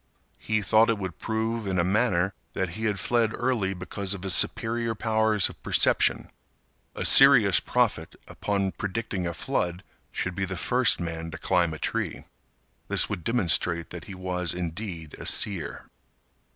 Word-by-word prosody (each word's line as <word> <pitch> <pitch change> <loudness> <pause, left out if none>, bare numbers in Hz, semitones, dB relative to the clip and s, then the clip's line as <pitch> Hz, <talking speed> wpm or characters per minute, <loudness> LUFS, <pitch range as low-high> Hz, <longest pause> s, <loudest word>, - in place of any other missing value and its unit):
He 110 -1 -1
thought 110 +3 +4
it 115 - +1
would 95 -4 -6
prove, 110 0 -2
in 95 -1 -1
a 85 - +3
manner, 95 -1 +1 0.2
that 95 -1 -2
he 110 +6 -5
had 105 -2 0
fled 115 -2 +1
early 115 -7 -1
because 95 +2 -5
of 95 - -10
his 95 -2 0
superior 115 +3 0
powers 110 -2 +2
of - - -12
perception. - - +2 0.6
A - - -2
serious 125 -8 +7
prophet - - -1
upon 100 -2 -2
predicting 100 -3 -4
a 85 - -3
flood 85 +5 -2 0.3
should 95 - -3
be 95 +1 -2
the 95 -1 -5
first 125 +5 +1
man 80 -1 -5
to 80 - -8
climb 90 -2 +1
a 80 - -6
tree. - - -3 0.6
This - - +3
would 85 - -4
demonstrate 85 -6 +2
that 85 - -8
he 95 - -9
was 90 -2 -3
indeed 85 -2 -6
a - - -6
seer. 90 -8 0
95 Hz, 165 wpm, -26 LUFS, 90-110 Hz, 0.6 s, serious